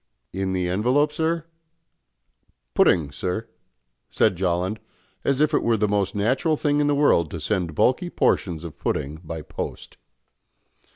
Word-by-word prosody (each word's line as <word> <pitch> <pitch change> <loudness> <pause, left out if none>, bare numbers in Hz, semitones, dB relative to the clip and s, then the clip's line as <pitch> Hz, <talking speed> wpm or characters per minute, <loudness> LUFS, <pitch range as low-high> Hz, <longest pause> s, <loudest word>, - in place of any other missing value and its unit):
"In 95 0 -2
the 90 -1 0
envelope, 125 +11 +2
sir? 165 +1 -1 1.3
Pudding, 80 -6 +3
sir," 90 +9 -3 0.6
said - - +2
Jolland, 90 +3 -1 0.4
as 140 -1 +1
if 150 +1 +3
it - - +3
were 115 -1 +2
the 105 0 +1
most 100 -1 0
natural 130 - +1
thing 145 0 +1
in 145 - +2
the 145 - +2
world 140 - +3
to 85 - -6
send 85 -1 -2
bulky 155 - +2
portions 85 - 0
of 80 -4 -9
pudding 75 +4 -2
by 80 -1 -6
post. - - -7
100 Hz, 150 wpm, -24 LUFS, 85-145 Hz, 1.3 s, Pudding